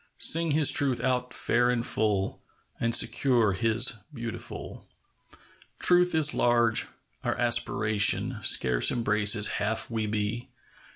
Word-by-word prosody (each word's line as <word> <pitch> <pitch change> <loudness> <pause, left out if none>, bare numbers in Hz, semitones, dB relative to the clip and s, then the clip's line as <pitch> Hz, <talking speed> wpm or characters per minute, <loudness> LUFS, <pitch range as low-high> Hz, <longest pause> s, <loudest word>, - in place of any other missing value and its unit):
Sing 165 +1 +3
His 150 -1 +3
Truth 135 -4 0
out 125 -1 -2
fair 120 +1 0
and 120 -1 -1
full, 105 -3 -1 0.4
And 115 0 0
secure 120 -7 +2
His 115 +3 +1
beautiful. 120 -5 -9 0.9
Truth 180 -1 +3
is 155 -1 +1
large. 120 -2 +1 0.4
Our - - -2
aspiration 105 +2 0
Scarce 65 -9 +3
embraces 105 -2 +1
half 110 +3 -2
we 110 -2 -3
be. 105 +3 -4
115 Hz, 115 wpm, -26 LUFS, 105-125 Hz, 0.9 s, Sing